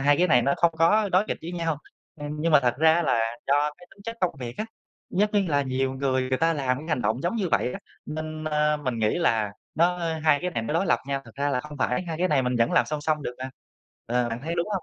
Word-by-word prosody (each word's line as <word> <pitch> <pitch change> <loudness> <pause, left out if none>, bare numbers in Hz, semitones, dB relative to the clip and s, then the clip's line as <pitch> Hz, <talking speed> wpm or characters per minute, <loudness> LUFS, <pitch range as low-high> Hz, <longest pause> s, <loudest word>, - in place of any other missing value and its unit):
hai 145 +1 +4
cái 180 - +4
này 125 -5 +5
nó 140 +3 +2
không 170 -1 +3
có 205 +6 +4
đối 185 +3 +3
nghịch - - -2
với 170 +2 -6
nhau. 165 -4 -1 0.4
Ừm, 145 - -4
nhưng 165 +1 +1
mà 150 - +7
thật 125 -2 +1
ra 160 +2 +5
là 115 -7 +2 0.3
do 145 +2 +3
cái 175 - -15
tính 200 - -18
chất 230 +1 -5
công 180 -5 +1
việc 120 -2 -6
á, 215 - -2 0.5
rất 210 +1 +3 0.2
là 145 -1 +2
nhiều 130 0 -1
người, 130 -1 0
người 130 0 0
ta 165 0 +3
làm 130 -4 0
cái 155 - -9
hành 155 -6 0
động 110 +5 0
giống 175 +7 -1
như 190 -5 0
vậy - - +2
ấy, - - -7 0.3
nên, 155 0 -5
ờ, 150 0 +2
mình 130 -6 -3
nghĩ 110 +8 +1
là 110 -11 +1 0.2
nó 175 +2 +2 0.3
hai 150 -2 +5
cái 180 - -2
này 115 -9 -2
nó 130 +8 -3
đối 180 +3 +1
lập 120 -4 +3
nhau, 140 -1 -1
thật - - -13
ra 140 +1 -1
là 125 -2 0
không 150 0 -10
phải, 125 +4 0
hai 165 -3 -5
cái 185 +1 +2
này 145 -5 +3
mình 125 0 0
vẫn 115 0 +2
làm - - +4
song 150 -1 -3
song 150 0 0
được 125 - -4
mà. 130 0 -5 0.6
Ờ, 120 +1 +1
bạn 115 +1 -4
thấy 165 +3 -3
đúng 170 +3 -1
hông? 190 - -1
150 Hz, 285 wpm, -26 LUFS, 130-170 Hz, 0.6 s, mà